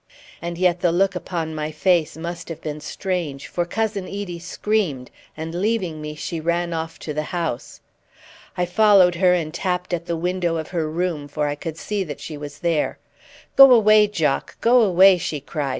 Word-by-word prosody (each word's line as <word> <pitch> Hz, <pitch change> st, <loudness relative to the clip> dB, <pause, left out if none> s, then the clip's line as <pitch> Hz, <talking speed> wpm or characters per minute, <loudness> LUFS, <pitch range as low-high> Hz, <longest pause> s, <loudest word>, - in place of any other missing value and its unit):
And 170 Hz, 0 st, -5 dB
yet 180 Hz, -1 st, +2 dB
the 175 Hz, -1 st, +2 dB
look 190 Hz, +3 st, +2 dB
upon 170 Hz, -3 st, -4 dB
my 155 Hz, 0 st, -3 dB
face 160 Hz, 0 st, +1 dB
must 170 Hz, +1 st, -6 dB
have 165 Hz, -, -6 dB
been 150 Hz, -1 st, -6 dB
strange, 165 Hz, -5 st, -4 dB
for 175 Hz, -, -2 dB
Cousin 210 Hz, +1 st, -2 dB
Edie 195 Hz, -4 st, -5 dB
screamed, 180 Hz, -7 st, -2 dB, 0.3 s
and 160 Hz, +1 st, -5 dB
leaving 185 Hz, -4 st, -1 dB
me 150 Hz, 0 st, -6 dB
she 165 Hz, +2 st, -4 dB
ran 170 Hz, +1 st, -1 dB
off 160 Hz, 0 st, -4 dB
to 150 Hz, -, -5 dB
the 150 Hz, -, -1 dB
house. 165 Hz, -9 st, -4 dB, 0.8 s
I 180 Hz, -, +1 dB
followed 195 Hz, -1 st, +5 dB
her 180 Hz, +1 st, +3 dB
and 160 Hz, -3 st, -3 dB
tapped 180 Hz, 0 st, -2 dB
at 170 Hz, 0 st, -3 dB
the 170 Hz, -, -1 dB
window 175 Hz, 0 st, -1 dB
of 160 Hz, -, -5 dB
her 165 Hz, -4 st, -2 dB
room, 165 Hz, -3 st, -2 dB
for 150 Hz, +1 st, -2 dB
I 145 Hz, -, 0 dB
could 155 Hz, +2 st, -6 dB
see 205 Hz, +3 st, -2 dB
that 145 Hz, -4 st, -7 dB
she 155 Hz, -, -7 dB
was 145 Hz, -1 st, -9 dB
there. 165 Hz, -3 st, +1 dB, 0.6 s
"Go 270 Hz, -1 st, +9 dB
away, 215 Hz, -3 st, +6 dB
Jock, 160 Hz, -9 st, -1 dB
go 245 Hz, +1 st, +5 dB
away!" 190 Hz, -2 st, +6 dB
she 155 Hz, -2 st, -3 dB
cried. 145 Hz, 0 st, -4 dB
170 Hz, 190 wpm, -22 LUFS, 155-185 Hz, 0.8 s, Go